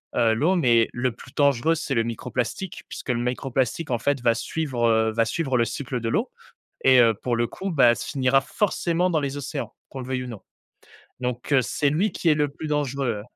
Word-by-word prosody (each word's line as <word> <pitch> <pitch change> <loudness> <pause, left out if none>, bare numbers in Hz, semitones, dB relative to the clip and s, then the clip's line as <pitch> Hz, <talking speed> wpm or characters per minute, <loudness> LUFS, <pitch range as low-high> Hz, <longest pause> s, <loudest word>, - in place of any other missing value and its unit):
heu, 115 -1 +3
l'eau, 155 +12 +2
mais 120 -7 +4
le 120 0 -1
plus 130 +3 -14
dangereux, 140 +2 +3
c'est 150 -4 -3
le 115 - +2
microplastique, 125 - -4
puisque - - -8
le 120 -1 +1
microplastique, 130 +3 -1
en 120 - +2
fait, 140 +4 0
va 115 -1 +4
suivre, 125 -1 -1
heu, 110 0 +3
va 115 +1 +2
suivre 135 +3 -1
le 120 - +3
cycle 125 -1 -4
de 115 - -1
l'eau - - 0 0.5
et 130 -1 +7
heu, 115 -1 +5
pour 120 +3 -2
le 120 - +1
coup, 190 +8 -5
bah 125 -6 +5
se - - -6
finira 135 -1 +3
forcément 180 0 0
dans 165 -3 +1
les 140 -1 -3
océans, 145 +1 -5 0.2
qu'on 135 - -8
le 125 - -7
veuille 130 -1 -2
ou - - -7
non. 115 -5 -8 0.8
Donc 125 +1 -4
heu, 135 - +5
c'est 140 +3 0
lui 190 +8 +1
qui 170 - 0
est - - +6
le 150 -1 +1
plus 145 - -8
dangereux. 140 -6 -1
130 Hz, 220 wpm, -24 LUFS, 120-145 Hz, 0.8 s, et